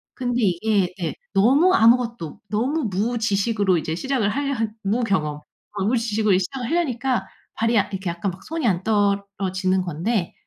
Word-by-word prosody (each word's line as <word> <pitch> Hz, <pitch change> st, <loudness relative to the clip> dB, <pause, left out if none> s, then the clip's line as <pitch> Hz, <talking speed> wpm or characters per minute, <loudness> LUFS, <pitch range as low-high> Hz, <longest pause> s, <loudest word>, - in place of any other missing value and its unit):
근데 245 Hz, -1 st, -1 dB
이게 190 Hz, 0 st, +1 dB
네, 165 Hz, -4 st, -3 dB, 0.2 s
너무 270 Hz, -, +4 dB
아무것도 230 Hz, -, +2 dB
너무 255 Hz, +8 st, 0 dB
무지식으로 205 Hz, -2 st, +1 dB
이제 160 Hz, 0 st, -3 dB
시작을 260 Hz, +1 st, 0 dB
하려 280 Hz, +4 st, -1 dB, 0.3 s
무경험 195 Hz, -9 st, 0 dB, 0.4 s
어 -, -, 0 dB
무지식으로 220 Hz, -2 st, +1 dB
이 -, -, +3 dB
시작을 245 Hz, +6 st, -4 dB
하려니까 265 Hz, -7 st, 0 dB, 0.3 s
발이 230 Hz, +1 st, +1 dB
약 205 Hz, -1 st, +2 dB
이렇게 190 Hz, -1 st, -3 dB
약간 170 Hz, +3 st, -2 dB
막 185 Hz, +2 st, -13 dB
손이 320 Hz, -1 st, -2 dB
안 185 Hz, -3 st, +1 dB
떨어지는 200 Hz, -3 st, 0 dB
건데. 175 Hz, +3 st, -2 dB
210 Hz, 345 characters per minute, -22 LUFS, 190-240 Hz, 0.4 s, 너무